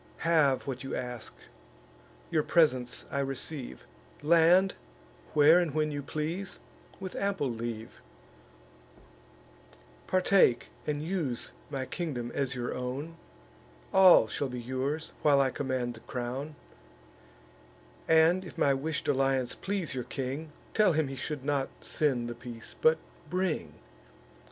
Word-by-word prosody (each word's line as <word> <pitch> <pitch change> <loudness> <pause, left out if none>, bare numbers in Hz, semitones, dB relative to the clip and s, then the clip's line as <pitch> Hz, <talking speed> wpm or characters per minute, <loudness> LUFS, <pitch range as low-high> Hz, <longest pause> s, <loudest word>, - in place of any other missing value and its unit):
Have 155 -5 +3
what 130 -2 -4
you 135 - -4
ask; 125 -2 -5 1.0
your 155 - +3
presents 140 -7 +2
I 140 - -1
receive; 135 - -4 0.4
Land, 170 +4 +5 0.6
where 155 +4 +7
and 165 -5 -1
when 155 -1 +1
you 145 -1 -3
please, 160 +7 -4 0.4
with 190 -1 -6
ample 195 -10 0
leave; 115 -1 -6 2.1
Partake 185 -9 +3 0.2
and 150 0 -1
use 160 -9 -2 0.2
my 135 -2 -3
kingdom 130 -8 -4
as 135 -2 -1
your 120 -1 -3
own; 135 +6 -4 0.8
All 190 -10 +8
shall 135 +4 -2
be 125 -1 -5
yours, 130 +6 -3
while 145 -2 +5
I 135 -1 +3
command 130 -3 -2
the 110 - -12
crown: 130 +6 -5 1.5
And, 160 +3 +5
if 180 - -11
my 140 - +4
wish'd 150 +3 -2
alliance 135 -2 +1
please 190 -5 -3
your 125 -2 -3
king, 135 +4 -4 0.2
Tell 210 -5 +4
him 155 -3 +1
he 135 - -5
should 135 +1 -4
not 140 -2 0
send 130 -6 0
the 120 - -4
peace, 120 -1 -10
but 160 0 +5 0.3
bring. 185 -2 -1
140 Hz, 125 wpm, -30 LUFS, 130-160 Hz, 2.1 s, All